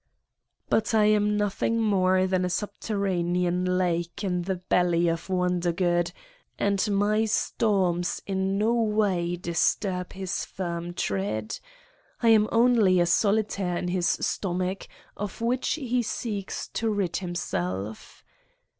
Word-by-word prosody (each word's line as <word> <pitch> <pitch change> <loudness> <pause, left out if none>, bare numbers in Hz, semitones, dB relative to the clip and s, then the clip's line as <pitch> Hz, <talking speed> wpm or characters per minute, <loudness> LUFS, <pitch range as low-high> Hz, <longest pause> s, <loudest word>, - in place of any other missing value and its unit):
But 220 +1 +1
I 215 -1 +5
am 210 0 +3
nothing 210 +2 0
more 185 -4 +3
than 185 -1 +1
a - - +1
subterraneai 180 -3 -1 0.2
lake 175 0 -1
in 180 -2 0
the 190 +2 -2
belly 175 -1 +1
of 165 -1 -2
Wondergood 175 -1 +1 0.5
and 200 -1 +1
my 205 +2 +2
stoi 190 -5 0
in 190 0 -1
no 220 +3 +2
way 210 -6 +1
disturb 180 +2 -1
his 190 -2 -3
firm 175 -1 -5
tread. 105 - -2 0.6
I 230 - +3
am 215 -1 +5
only 230 -6 +4
a 175 - +4
solitaire 200 -2 +1
in 180 - -2
his 175 -1 0
stomach, 185 0 -1 0.3
of 205 +2 -5
which 240 +3 0
he 250 -5 -1
seeks 210 -3 -4
to 225 - -1
rid 200 -5 -1
himself 105 - -4
185 Hz, 125 wpm, -26 LUFS, 175-210 Hz, 0.6 s, I